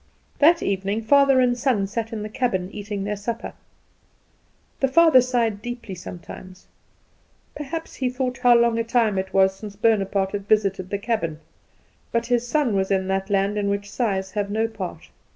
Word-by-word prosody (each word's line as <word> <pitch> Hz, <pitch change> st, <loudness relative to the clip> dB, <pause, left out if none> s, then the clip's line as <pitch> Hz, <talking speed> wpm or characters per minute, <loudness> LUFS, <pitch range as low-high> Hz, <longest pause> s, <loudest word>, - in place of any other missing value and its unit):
That 330 Hz, +3 st, +5 dB
evening 200 Hz, +3 st, -1 dB
father 275 Hz, +2 st, +5 dB
and 250 Hz, -1 st, +3 dB
son 245 Hz, -5 st, +1 dB
sat 225 Hz, +3 st, -4 dB
in 215 Hz, -2 st, -4 dB
the -, -, -4 dB
cabin 210 Hz, -5 st, -2 dB
eating 205 Hz, -1 st, -5 dB
their 205 Hz, +1 st, -2 dB
supper. 225 Hz, +3 st, -5 dB, 1.3 s
The 270 Hz, -, +2 dB
father 310 Hz, -1 st, +6 dB
sighed 235 Hz, -4 st, 0 dB
deeply 240 Hz, -3 st, -6 dB
sometimes. 185 Hz, +1 st, -10 dB, 0.9 s
Perhaps 315 Hz, +3 st, -6 dB
he 255 Hz, -2 st, 0 dB
thought 250 Hz, 0 st, -3 dB
how 245 Hz, -1 st, +5 dB
long 235 Hz, -1 st, +2 dB
a -, -, +1 dB
time 230 Hz, -4 st, +1 dB
it 190 Hz, 0 st, -4 dB
was 190 Hz, 0 st, +3 dB
since 205 Hz, 0 st, -9 dB
Bonaparte 200 Hz, -3 st, +1 dB
had 200 Hz, -1 st, -5 dB
visited 195 Hz, -4 st, +1 dB
the 200 Hz, -, -1 dB
cabin; 200 Hz, -8 st, -2 dB, 0.7 s
but 235 Hz, 0 st, 0 dB
his 245 Hz, 0 st, 0 dB
son 285 Hz, -4 st, +1 dB
was 190 Hz, 0 st, 0 dB
in 190 Hz, -1 st, 0 dB
that 195 Hz, +1 st, -1 dB
land 200 Hz, +1 st, +1 dB
in 200 Hz, -1 st, 0 dB
which 200 Hz, 0 st, -3 dB
sighs 195 Hz, -6 st, -1 dB
have 205 Hz, 0 st, -2 dB
no 220 Hz, +2 st, 0 dB
part. 215 Hz, -5 st, -8 dB
215 Hz, 175 wpm, -23 LUFS, 195-245 Hz, 1.3 s, father